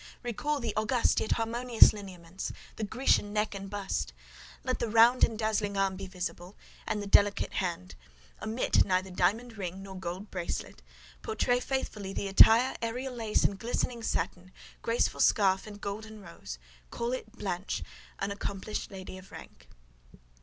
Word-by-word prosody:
Recall 290 +5 -1
the 230 -4 -3
august 230 +3 +2
yet - - 0
harmonious 235 +1 +5
lineaments, 185 -3 -7 0.2
the 220 - -4
Grecian 215 -1 +2
neck 210 0 0
and 195 0 -6
bust; 195 - -3 0.5
let 255 -1 -1
the 235 - -1
round 230 +3 +6
and 225 - +3
dazzling 215 -2 0
arm 195 -1 +2
be 195 0 -6
visible, 180 0 -5 0.3
and 210 -1 -1
the - - -5
delicate 200 0 +3
hand; 170 - -2 0.5
omit 225 +3 +2
neither 185 0 0
diamond 220 +6 0
ring 190 0 -4
nor 195 -1 -8
gold 185 +2 -6
bracelet; 170 - -4 0.4
portray 245 +3 +1
faithfully 215 -7 -3
the 200 - -2
attire, 225 +6 +7
aërial 250 +3 -3
lace 225 -3 +1
and 195 -1 +1
glistening 235 +1 -2
satin, 185 -4 -2 0.3
graceful 230 +1 +1
scarf 195 -1 +4
and 205 -1 -10
golden 215 +2 -6
rose; 170 - -9 0.3
call 235 +1 -2
it 225 -4 -5
'Blanche, 195 -4 -3 0.3
an 195 +1 -2
accomplished 200 +1 -4
lady 185 -1 -8
of 185 - -16
rank. - - -12
205 Hz, 155 wpm, -30 LUFS, 190-230 Hz, 0.5 s, attire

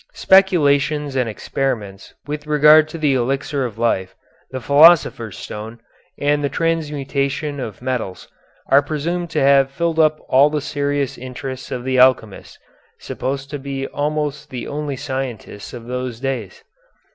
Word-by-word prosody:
Speculations 150 -6 +3
and 125 -3 0
experiments 105 -4 -4
with 150 +1 -6
regard 150 +1 +6
to 165 - -7
the 150 -3 +1
elixir 135 +2 -1
of 115 -3 -6
life, 95 -5 -1 0.3
the 130 - -5
philosopher's 140 - +4
stone, 110 +2 -8 0.4
and 145 0 +1
the 140 - 0
transmutation 145 -3 -2
of 115 -2 -7
metals, 125 -8 -4 0.4
are 140 - +6
presumed 165 +4 -3
to - - -1
have 135 0 +4
filled 165 +3 -2
up 155 -1 +3
all 140 +3 +5
the 150 0 -1
serious 140 -1 -2
interests 130 +1 -7
of 125 - -4
the 130 0 0
alchemists, 125 -5 +2 0.4
supposed 135 +1 -5
to 145 - -4
be 135 0 -4
almost 150 0 -3
the 125 - -6
only 145 -1 -4
scientists 125 -6 -6
of 120 -2 -9
those 125 -1 -4
days. 130 -7 -4
140 Hz, 145 wpm, -19 LUFS, 125-150 Hz, 0.4 s, regard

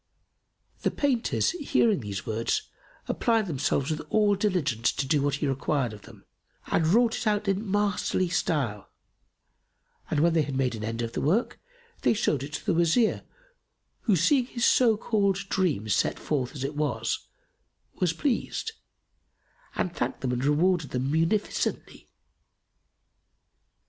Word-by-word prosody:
The - - +2
painters, 265 -5 +1
hearing 255 - +1
these 100 -4 -5
words, 115 - -1 0.4
applied 225 -3 +1
themselves 140 -3 -1
with 155 0 -2
all 210 -1 +3
diligence 175 - +1
to 135 - -2
do 140 +1 +2
what 145 0 +1
he 145 +1 -2
required 135 -2 -1
of 105 - -11
them - - -16 0.5
and 160 - +2
wrought 230 +6 +4
it - - -3
out 210 -1 +1
in 195 +2 -1
masterly 200 -2 +1
style; 140 - -1 1.2
and 150 - +1
when 170 +1 +4
they 165 - +3
had 140 -2 -3
made 130 -2 +1
an 110 -1 -6
end 115 +2 -3
of 115 0 -4
the - - -2
work, 185 - +1 0.4
they - - +3
showed 155 - +1
it 145 +2 -7
to - - -5
the - - +2
Wazir 170 +7 +2 0.8
who, 210 - +4
seeing 245 - +3
his 240 -2 -1
so 230 -4 +4
called 205 -3 +1
dream 155 - 0
set 105 0 +1
forth 135 -2 -2
as 135 - -4
it 140 +2 -3
was[FN#280] 150 -1 -5
was 175 -3 +2
pleased 280 - -1 1.0
and 175 - -2
thanked 125 - -2
them 130 - -1
and 125 +1 -1
rewarded 160 +1 +2
them 130 +2 -2
munificently. 165 +7 -1
160 Hz, 150 wpm, -27 LUFS, 135-205 Hz, 1.2 s, wrought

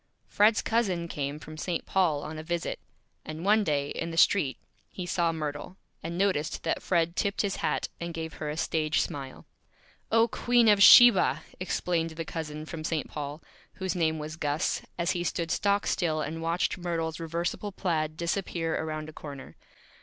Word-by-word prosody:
Fred's 215 +2 +3
Cousin 190 -7 0
came 145 -2 -3
from 155 0 -10
St. 175 -1 -2
Paul 165 -7 +1
on 155 0 -6
a - - -6
Visit; 170 +1 -3 0.4
and 155 +3 -7
one 210 +1 +4
Day, 145 -5 0
in 165 - -3
the 165 - -6
Street, 160 -6 +4 0.3
he 180 - -6
saw 170 -1 +1
Myrtle, 155 +3 -5 0.2
and 170 +1 -5
noticed 185 -6 0
that 165 - -1
Fred 170 -1 +1
tipped 200 +1 0
his 200 -1 -1
Hat, - - -1
and 170 0 -4
gave 160 -1 -5
her 150 - -2
a 150 - -4
Stage 155 -1 0
Smile. 135 -2 -4 0.7
"Oh, 225 +1 +5
Queen 240 0 +2
of 205 -2 +5
Sheba!" 195 - +8 0.2
exclaimed 175 -2 -1
the 165 0 -6
Cousin 155 -2 -5
from 155 0 -7
St. 155 -1 -2
Paul, 145 +1 -6 0.3
whose 190 -3 -3
name 160 -2 +1
was 155 +1 -6
Gus, 150 -1 -1 0.2
as 170 +1 +1
he 175 -2 -1
stood 170 -1 -2
stock 200 0 +1
still 160 -4 0
and 155 +2 -4
watched 170 +2 0
Myrtle's 165 -2 -2
Reversible 170 +5 -3
Plaid 155 -5 -1
disappear 170 -1 -2
around 155 -1 -4
a 155 - -10
Corner. 140 -3 -9
165 Hz, 175 wpm, -28 LUFS, 155-180 Hz, 0.7 s, Sheba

